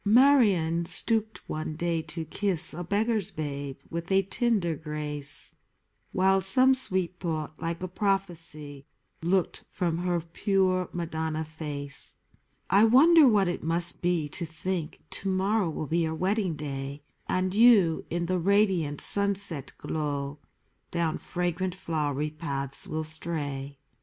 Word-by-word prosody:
Marion 205 Hz, -, +4 dB
stooped 220 Hz, +4 st, -1 dB
one 155 Hz, 0 st, -4 dB
day 170 Hz, 0 st, -1 dB
to 160 Hz, +1 st, -6 dB
kiss 185 Hz, +1 st, +1 dB
A 175 Hz, +3 st, -5 dB
beggar's 210 Hz, +2 st, 0 dB
babe 140 Hz, -5 st, -5 dB
with 170 Hz, +2 st, -4 dB
a 195 Hz, 0 st, +4 dB
tender 195 Hz, -4 st, 0 dB
grace; 150 Hz, -2 st, -2 dB, 0.6 s
While 190 Hz, +1 st, +3 dB
some 255 Hz, +7 st, +6 dB
sweet 185 Hz, -8 st, 0 dB
thought, 155 Hz, -3 st, -4 dB
like 170 Hz, +2 st, -3 dB
a -, -, -2 dB
prophecy, 170 Hz, -7 st, -3 dB, 0.3 s
Looked 180 Hz, +2 st, 0 dB
from 170 Hz, -3 st, -1 dB
her 175 Hz, -1 st, 0 dB
pure 185 Hz, +2 st, 0 dB
Madonna 160 Hz, -2 st, -3 dB
face. 150 Hz, -3 st, -4 dB, 0.5 s
I 200 Hz, +3 st, +5 dB
wonder 290 Hz, +7 st, +7 dB
what 205 Hz, -5 st, +4 dB
it 175 Hz, -, -2 dB
must 170 Hz, +2 st, +2 dB
be 175 Hz, -4 st, +1 dB
to 175 Hz, -, -5 dB
think 165 Hz, 0 st, -4 dB, 0.2 s
To 195 Hz, -, -2 dB
morrow 190 Hz, 0 st, +1 dB
will 155 Hz, -, -4 dB
be 165 Hz, +4 st, 0 dB
your 160 Hz, -1 st, 0 dB
wedding 190 Hz, 0 st, 0 dB
day, 140 Hz, -1 st, -6 dB, 0.3 s
And 185 Hz, 0 st, 0 dB
you, 205 Hz, -7 st, +5 dB
in 170 Hz, +1 st, -1 dB
the 185 Hz, +1 st, 0 dB
radiant 185 Hz, -6 st, +2 dB
sunset 200 Hz, -8 st, +1 dB
glow 145 Hz, -2 st, -3 dB, 0.5 s
Down 170 Hz, -2 st, -1 dB
fragrant 180 Hz, +1 st, -2 dB
flowery 150 Hz, -4 st, -2 dB
paths 140 Hz, -4 st, -4 dB
will 155 Hz, 0 st, -3 dB
stray. 145 Hz, -3 st, -4 dB
170 Hz, 135 wpm, -27 LUFS, 155-195 Hz, 0.6 s, wonder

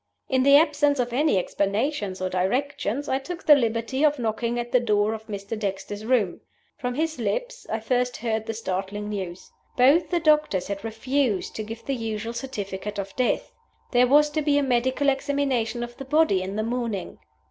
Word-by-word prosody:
"In 260 Hz, -1 st, +2 dB
the 280 Hz, +2 st, +7 dB
absence 290 Hz, -2 st, +3 dB
of 245 Hz, -1 st, -1 dB
any 295 Hz, -3 st, +3 dB
explanations 200 Hz, +1 st, -1 dB
or 185 Hz, -, 0 dB
directions, 250 Hz, +7 st, -1 dB
I 265 Hz, -, +1 dB
took 340 Hz, +5 st, -7 dB
the 300 Hz, -, +9 dB
liberty 235 Hz, +1 st, +1 dB
of 295 Hz, -1 st, +4 dB
knocking 235 Hz, 0 st, -1 dB
at 240 Hz, 0 st, -3 dB
the 250 Hz, -, +5 dB
door 210 Hz, -2 st, +1 dB
of 220 Hz, 0 st, -8 dB
Mr. 200 Hz, 0 st, -5 dB
Dexter's 205 Hz, 0 st, -4 dB
room. 225 Hz, -8 st, +1 dB, 0.3 s
From 250 Hz, 0 st, -3 dB
his 315 Hz, -1 st, -1 dB
lips -, -, -3 dB
I 220 Hz, 0 st, -2 dB
first 250 Hz, +2 st, 0 dB
heard 220 Hz, -2 st, -2 dB
the 225 Hz, -, -3 dB
startling 205 Hz, 0 st, -3 dB
news. 190 Hz, -3 st, -6 dB, 0.3 s
Both 275 Hz, +7 st, +5 dB
the 350 Hz, -, +1 dB
doctors 300 Hz, -, +2 dB
had 200 Hz, 0 st, -4 dB
refused 225 Hz, -1 st, -1 dB
to 215 Hz, -, -3 dB
give 225 Hz, +2 st, -8 dB
the 275 Hz, -, -1 dB
usual 225 Hz, -2 st, -3 dB
certificate 210 Hz, -5 st, -5 dB
of 195 Hz, -1 st, -5 dB
death! 255 Hz, -1 st, 0 dB, 0.4 s
There 250 Hz, 0 st, +5 dB
was 295 Hz, +3 st, +5 dB
to 310 Hz, -, 0 dB
be 290 Hz, -1 st, +2 dB
a 285 Hz, -, +2 dB
medical 260 Hz, +2 st, +1 dB
examination 270 Hz, -4 st, 0 dB
of 240 Hz, 0 st, -7 dB
the 270 Hz, -, -7 dB
body 295 Hz, -8 st, +3 dB
the 185 Hz, -, -4 dB
next 210 Hz, +3 st, -2 dB
morning." 235 Hz, -5 st, -3 dB
240 Hz, 190 wpm, -25 LUFS, 210-280 Hz, 0.4 s, the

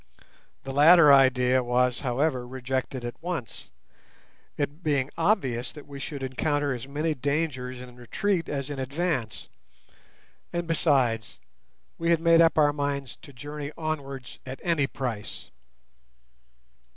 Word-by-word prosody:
The 135 Hz, -, -6 dB
latter 150 Hz, +1 st, +8 dB
idea 130 Hz, -1 st, +4 dB
was, 125 Hz, 0 st, +1 dB
however, 130 Hz, -1 st, 0 dB
rejected 130 Hz, 0 st, -3 dB
at 120 Hz, +5 st, -7 dB
once, 170 Hz, -8 st, -5 dB, 0.9 s
it 145 Hz, +3 st, -3 dB
being 145 Hz, -4 st, 0 dB
obvious 135 Hz, -, +1 dB
that 150 Hz, -, -11 dB
we 140 Hz, -1 st, -9 dB
should 140 Hz, 0 st, -5 dB
encounter 145 Hz, +2 st, 0 dB
as 125 Hz, +1 st, -6 dB
many 150 Hz, +3 st, -1 dB
dangers 135 Hz, -2 st, -2 dB
in 125 Hz, -1 st, -11 dB
retreat 165 Hz, -, -1 dB
as 140 Hz, 0 st, -3 dB
in 140 Hz, -, -5 dB
advance; 130 Hz, -, -2 dB, 1.0 s
and, 175 Hz, 0 st, -2 dB
besides, 130 Hz, -9 st, +1 dB, 0.6 s
we 170 Hz, 0 st, 0 dB
had 170 Hz, -1 st, +4 dB
made 165 Hz, 0 st, +5 dB
up 165 Hz, -1 st, +4 dB
our 145 Hz, -1 st, +5 dB
minds 140 Hz, -3 st, -3 dB
to -, -, -13 dB
journey 145 Hz, +2 st, -7 dB
onwards 140 Hz, -5 st, -5 dB
at 130 Hz, +1 st, -7 dB
any 165 Hz, -5 st, +2 dB
price. 120 Hz, -7 st, -5 dB
140 Hz, 130 wpm, -27 LUFS, 125-155 Hz, 1.0 s, latter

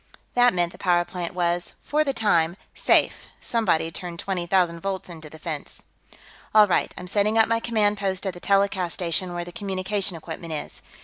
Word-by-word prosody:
That 245 Hz, -4 st, +4 dB
meant 175 Hz, -1 st, +1 dB
the -, -, -15 dB
power 175 Hz, -2 st, +2 dB
plant 175 Hz, 0 st, -5 dB
was, 175 Hz, 0 st, -1 dB
for 305 Hz, +1 st, +2 dB
the 280 Hz, -, 0 dB
time, 175 Hz, -8 st, +2 dB, 0.2 s
safe; -, -, +2 dB
somebody'd 175 Hz, -8 st, 0 dB
turned 175 Hz, -2 st, -6 dB
twenty 180 Hz, -1 st, -3 dB
thousand 175 Hz, -2 st, +2 dB
volts 190 Hz, +1 st, -4 dB
into 160 Hz, -3 st, -9 dB
the 160 Hz, -, -12 dB
fence. 155 Hz, -2 st, -6 dB, 0.7 s
"All 215 Hz, -1 st, +9 dB
right. 180 Hz, -, +1 dB
I'm 180 Hz, -, -7 dB
setting 210 Hz, +3 st, +1 dB
up 225 Hz, -, +6 dB
my 230 Hz, 0 st, +2 dB
command 215 Hz, -3 st, +1 dB
post 190 Hz, -1 st, -1 dB
at 190 Hz, -, -1 dB
the 175 Hz, -, -10 dB
telecast 195 Hz, -2 st, +1 dB
station, 175 Hz, 0 st, -2 dB
where 175 Hz, 0 st, -3 dB
the 175 Hz, -, -9 dB
communication 195 Hz, -2 st, -2 dB
equipment 160 Hz, 0 st, -7 dB
is." 150 Hz, -, -5 dB
180 Hz, 190 wpm, -25 LUFS, 170-200 Hz, 0.7 s, All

